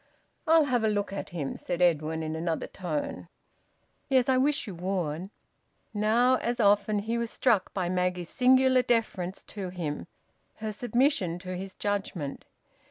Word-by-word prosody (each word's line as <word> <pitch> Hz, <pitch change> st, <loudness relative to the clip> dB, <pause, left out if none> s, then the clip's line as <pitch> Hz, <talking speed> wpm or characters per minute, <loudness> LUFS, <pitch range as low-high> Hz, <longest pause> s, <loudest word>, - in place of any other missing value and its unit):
"I'll 325 Hz, 0 st, +6 dB
have 245 Hz, -4 st, +1 dB
a -, -, +3 dB
look 205 Hz, -1 st, -1 dB
at 200 Hz, -, -5 dB
him," 155 Hz, -6 st, -4 dB
said 175 Hz, -1 st, -4 dB
Edwin, 160 Hz, -2 st, +2 dB
in 155 Hz, 0 st, -3 dB
another 165 Hz, 0 st, -2 dB
tone. 150 Hz, -, -4 dB, 0.8 s
"Yes, 260 Hz, -1 st, +3 dB
I 260 Hz, -, +4 dB
wish 280 Hz, +2 st, +2 dB
you 205 Hz, -, -6 dB
would." 180 Hz, -1 st, -3 dB, 0.6 s
Now, 230 Hz, +5 st, +3 dB
as 240 Hz, 0 st, -2 dB
often, 205 Hz, 0 st, +3 dB
he 225 Hz, +3 st, -1 dB
was 235 Hz, -1 st, -2 dB
struck 225 Hz, -7 st, +1 dB
by 185 Hz, -3 st, 0 dB
Maggie's 180 Hz, -1 st, -1 dB
singular 260 Hz, 0 st, +4 dB
deference 220 Hz, -7 st, -1 dB
to 195 Hz, -3 st, -6 dB
him, 165 Hz, -5 st, -4 dB, 0.5 s
her 220 Hz, 0 st, -4 dB
submission 235 Hz, -, +1 dB
to 185 Hz, 0 st, -4 dB
his 190 Hz, +1 st, -6 dB
judgement. 195 Hz, -8 st, -3 dB
200 Hz, 155 wpm, -28 LUFS, 175-240 Hz, 0.8 s, I'll